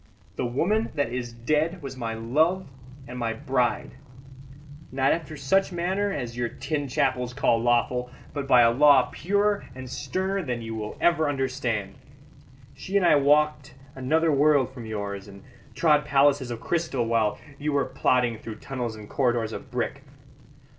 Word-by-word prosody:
The 125 Hz, -, -1 dB
woman 195 Hz, -, 0 dB
that 140 Hz, -5 st, -1 dB
is 125 Hz, -2 st, -4 dB
dead 155 Hz, +8 st, -1 dB
was 135 Hz, -1 st, -6 dB
my 115 Hz, -3 st, -4 dB
love 155 Hz, +12 st, +1 dB, 0.4 s
and 125 Hz, 0 st, -7 dB
my 115 Hz, -1 st, -1 dB
bride; 125 Hz, +1 st, -1 dB, 1.0 s
not 135 Hz, +1 st, +2 dB
after 155 Hz, -2 st, -3 dB
such 190 Hz, +9 st, +1 dB
manner 185 Hz, +4 st, -1 dB
as 120 Hz, -8 st, -4 dB
your 120 Hz, -1 st, -1 dB
tin 140 Hz, +3 st, -3 dB
chapels 125 Hz, -1 st, 0 dB
call 125 Hz, -5 st, +2 dB
lawful, 120 Hz, +1 st, +1 dB, 0.2 s
but 140 Hz, -2 st, -4 dB
by 125 Hz, -2 st, +6 dB
a 115 Hz, 0 st, +5 dB
law 135 Hz, -1 st, +5 dB
purer 200 Hz, +4 st, 0 dB
and 130 Hz, 0 st, -8 dB
sterner 190 Hz, +9 st, -2 dB
than 125 Hz, -7 st, -4 dB
you 115 Hz, 0 st, -5 dB
will 105 Hz, -1 st, -5 dB
ever 165 Hz, -3 st, +3 dB
understand. 130 Hz, -6 st, -2 dB, 0.8 s
She 195 Hz, +1 st, -2 dB
and 190 Hz, -, +2 dB
I -, -, +6 dB
walked 150 Hz, -1 st, +2 dB, 0.2 s
another 155 Hz, +5 st, +1 dB
world 140 Hz, -2 st, +3 dB
from 120 Hz, -4 st, -8 dB
yours, 100 Hz, -2 st, -5 dB
and 100 Hz, -1 st, -13 dB, 0.3 s
trod 150 Hz, -3 st, +3 dB
palaces 140 Hz, -2 st, +3 dB
of 120 Hz, -2 st, -5 dB
crystal 160 Hz, -5 st, -1 dB
while 115 Hz, -2 st, +1 dB, 0.2 s
you 150 Hz, +1 st, -1 dB
were 140 Hz, -1 st, +1 dB
plodding 120 Hz, -3 st, +1 dB
through 110 Hz, -1 st, -7 dB
tunnels 125 Hz, -4 st, -5 dB
and 105 Hz, -1 st, -10 dB
corridors 120 Hz, -4 st, 0 dB
of -, -, -8 dB
brick. -, -, -3 dB
130 Hz, 160 wpm, -26 LUFS, 120-150 Hz, 1.0 s, by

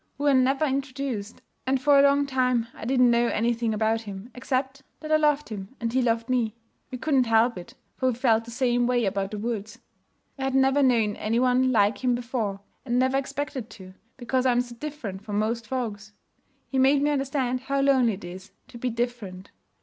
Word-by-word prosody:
We 285 Hz, -, -5 dB
were 290 Hz, -1 st, +4 dB
never 270 Hz, +3 st, +3 dB
introduced; 265 Hz, -6 st, -4 dB, 0.2 s
and, 265 Hz, 0 st, +2 dB
for 285 Hz, +1 st, +5 dB
a -, -, +8 dB
long 280 Hz, 0 st, +4 dB
time, 255 Hz, -3 st, +1 dB
I -, -, -9 dB
didn't 250 Hz, -1 st, +4 dB
know 235 Hz, 0 st, +3 dB
anything 230 Hz, 0 st, 0 dB
about 220 Hz, +1 st, 0 dB
him 205 Hz, +2 st, -9 dB
except 265 Hz, +1 st, -2 dB, 0.2 s
that 310 Hz, 0 st, -7 dB
I -, -, +6 dB
loved 295 Hz, -2 st, +1 dB
him 200 Hz, +2 st, -8 dB
and 230 Hz, -1 st, -3 dB
he 260 Hz, -, +2 dB
loved 230 Hz, -1 st, 0 dB
me. 235 Hz, -4 st, 0 dB, 0.3 s
We 255 Hz, -, -5 dB
couldn't 265 Hz, -3 st, +1 dB
help 230 Hz, +2 st, +3 dB
it, 180 Hz, -1 st, -10 dB, 0.2 s
for 260 Hz, -, 0 dB
we 245 Hz, -, -1 dB
felt 230 Hz, -2 st, +2 dB
the -, -, -10 dB
same 240 Hz, 0 st, +1 dB
way 245 Hz, -2 st, +1 dB
about 195 Hz, 0 st, -1 dB
the 210 Hz, -, -6 dB
woods. 220 Hz, 0 st, -4 dB, 0.6 s
I 265 Hz, -, -2 dB
had 270 Hz, 0 st, -1 dB
never 270 Hz, +1 st, +4 dB
known 230 Hz, -6 st, +2 dB
any 225 Hz, +2 st, 0 dB
one 255 Hz, +1 st, +3 dB
like 210 Hz, +1 st, +2 dB
him 250 Hz, -1 st, +2 dB
before, 230 Hz, -5 st, -3 dB, 0.2 s
and 245 Hz, -2 st, -1 dB
never 260 Hz, +1 st, +2 dB
expected 275 Hz, -3 st, -4 dB
to, 185 Hz, -3 st, -12 dB, 0.2 s
because 255 Hz, +1 st, 0 dB
I'm 245 Hz, -1 st, +3 dB
so 245 Hz, -1 st, -8 dB
different 235 Hz, -8 st, -7 dB
from 205 Hz, -1 st, -4 dB
most 230 Hz, +2 st, -1 dB
folks. 215 Hz, -5 st, -4 dB, 0.6 s
He 265 Hz, -, +1 dB
made 275 Hz, +2 st, +4 dB
me 295 Hz, -, +2 dB
understand 270 Hz, -3 st, -1 dB
how 275 Hz, +2 st, -1 dB
lonely 260 Hz, -5 st, +3 dB
it 195 Hz, -, -9 dB
is 185 Hz, +2 st, -9 dB, 0.2 s
to 235 Hz, -, -11 dB
be 250 Hz, -, -1 dB
different. 225 Hz, -6 st, -4 dB
245 Hz, 205 wpm, -25 LUFS, 225-265 Hz, 0.6 s, a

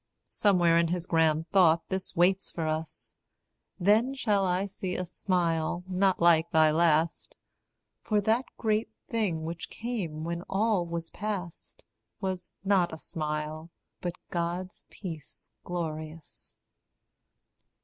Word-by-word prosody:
Somewhere 175 Hz, -5 st, +4 dB
in 170 Hz, -, +3 dB
his 175 Hz, 0 st, -2 dB
grand 160 Hz, -1 st, +2 dB
thought 170 Hz, -4 st, +5 dB
this 190 Hz, 0 st, -3 dB
waits 185 Hz, +3 st, +2 dB
for 165 Hz, -, -3 dB
us. 155 Hz, 0 st, -4 dB, 0.6 s
Then 220 Hz, +8 st, +3 dB
shall 210 Hz, -6 st, +1 dB
I 180 Hz, +2 st, +1 dB
see 190 Hz, -2 st, -4 dB
a 185 Hz, -, -2 dB
smile 175 Hz, -2 st, 0 dB
not 190 Hz, 0 st, +2 dB
like 170 Hz, -1 st, +5 dB
thy 160 Hz, -2 st, +5 dB
last 160 Hz, 0 st, +2 dB, 0.7 s
For 210 Hz, -2 st, +1 dB
that 225 Hz, +5 st, +2 dB
great 220 Hz, 0 st, +1 dB, 0.2 s
thing 195 Hz, -9 st, 0 dB
which 165 Hz, +1 st, -5 dB
came 195 Hz, -10 st, -4 dB
when 170 Hz, +1 st, -3 dB
all 200 Hz, -3 st, +1 dB
was 170 Hz, 0 st, -4 dB
past, 195 Hz, -4 st, -5 dB, 0.4 s
Was 185 Hz, -2 st, -4 dB
not 190 Hz, -3 st, +3 dB
a 160 Hz, -, -6 dB
smile, 155 Hz, 0 st, -4 dB, 0.3 s
but 175 Hz, -1 st, -3 dB, 0.2 s
God's 175 Hz, +2 st, -3 dB
peace 165 Hz, -7 st, -9 dB
glorious. 160 Hz, -2 st, -6 dB
175 Hz, 125 wpm, -29 LUFS, 165-195 Hz, 0.7 s, thought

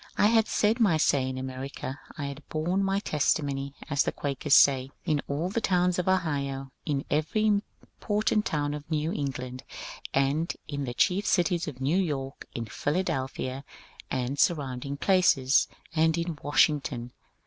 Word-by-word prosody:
I -, -, +4 dB
had 225 Hz, 0 st, +4 dB
said 220 Hz, +3 st, +2 dB
my 195 Hz, -9 st, +4 dB
say 135 Hz, -4 st, +2 dB
in 130 Hz, -, -4 dB
America; 130 Hz, +1 st, -5 dB, 0.2 s
I 145 Hz, -, -3 dB
had 140 Hz, +1 st, -6 dB
borne 175 Hz, +5 st, 0 dB
my 195 Hz, 0 st, +1 dB
testimony, 140 Hz, -4 st, 0 dB
as 145 Hz, -2 st, +1 dB
the -, -, +1 dB
Quakers 140 Hz, 0 st, +1 dB
say, 135 Hz, -2 st, +5 dB, 0.2 s
in 150 Hz, -4 st, +1 dB
all 150 Hz, +6 st, -1 dB
the 225 Hz, +4 st, -1 dB
towns 180 Hz, -2 st, +2 dB
of 180 Hz, -, -2 dB
Ohio, 140 Hz, -7 st, 0 dB, 0.2 s
in 140 Hz, -2 st, -1 dB
every 155 Hz, +9 st, +1 dB
important 210 Hz, 0 st, 0 dB
town 145 Hz, -1 st, -1 dB
of 150 Hz, +1 st, -7 dB
New 155 Hz, 0 st, 0 dB
England, 130 Hz, -4 st, -4 dB, 0.5 s
and 140 Hz, +5 st, +1 dB, 0.2 s
in 145 Hz, -2 st, -3 dB
the 120 Hz, -1 st, -5 dB
chief 195 Hz, +7 st, +2 dB
cities 175 Hz, -2 st, +2 dB
of 135 Hz, -4 st, -6 dB
New 145 Hz, +8 st, +2 dB
York, 140 Hz, -6 st, -3 dB
in 115 Hz, -, -3 dB
Philadelphia 135 Hz, -, -2 dB, 0.5 s
and 130 Hz, +2 st, -2 dB
surround 135 Hz, -7 st, +1 dB
ing 140 Hz, 0 st, -4 dB
places, 145 Hz, -7 st, +4 dB, 0.3 s
and 160 Hz, +1 st, +3 dB
in 170 Hz, -1 st, -2 dB
Washington. 145 Hz, -4 st, +1 dB
145 Hz, 160 wpm, -28 LUFS, 135-175 Hz, 0.5 s, say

